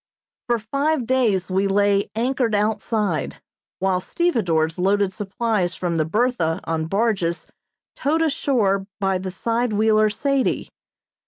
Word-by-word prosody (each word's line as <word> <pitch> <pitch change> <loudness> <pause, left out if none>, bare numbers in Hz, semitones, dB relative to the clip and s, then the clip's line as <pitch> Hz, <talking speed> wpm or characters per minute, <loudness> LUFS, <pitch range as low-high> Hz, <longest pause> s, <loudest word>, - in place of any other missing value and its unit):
For 240 -1 +2
five 275 +5 -1
days 220 -8 +1
we 190 +2 +2
lay 200 0 +2
anchored 240 -1 0
outside, 210 - -1 0.4
while 190 -1 0
stevedores 180 - 0
loaded 195 +1 +2
supplies 205 -2 -1
from 175 -2 -2
the 155 - +1
"Bertha" 195 -4 0
on 160 -1 -2
barges 195 -4 0 0.5
towed 315 +4 +1
ashore 220 -10 +1
by 195 -2 0
the 190 +1 -4
side 230 +4 -1
wheeler 215 0 +3
"Sadie." 275 +5 0
205 Hz, 120 wpm, -22 LUFS, 185-235 Hz, 0.5 s, wheeler